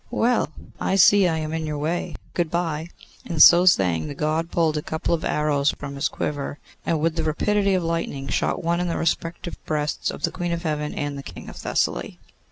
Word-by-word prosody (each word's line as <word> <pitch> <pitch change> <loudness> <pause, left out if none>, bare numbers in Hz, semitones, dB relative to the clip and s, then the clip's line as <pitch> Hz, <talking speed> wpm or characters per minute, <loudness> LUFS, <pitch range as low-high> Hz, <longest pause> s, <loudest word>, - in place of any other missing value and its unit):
Well! 245 -6 +1 0.3
I 190 - 0
see 195 +1 +6
I 165 -2 0
am 155 0 -3
in 160 -1 -2
your 150 -1 -3
way. 160 +4 -2 0.2
Good 170 -2 0
bye!' 165 -1 -2 0.3
And 165 -3 -4
so 175 +3 +8
saying, 90 - +3
the 145 - -6
God 155 +3 -1
pulled 165 -3 +1
a 150 - -1
couple 160 +2 -2
of 165 - -1
arrows 150 -1 +1
from 140 -1 -6
his 140 - 0
quiver, 145 -1 -4 0.3
and 165 - 0
with 165 +2 0
the 160 - 0
rapidity 195 +5 +1
of 180 - 0
lightning 165 -5 -2
shot - - -1
one 170 +1 +1
in 180 - -1
the 170 - -1
respective 170 +1 -2
breasts 150 -1 -1
of - - -7
the - - +1
Queen 175 -1 -3
of 170 +1 -3
Heaven 150 -2 -2
and 145 -1 -3
the - - -5
King - - -10
of - - -10
Thessaly. - - -1
160 Hz, 215 wpm, -23 LUFS, 150-170 Hz, 0.3 s, so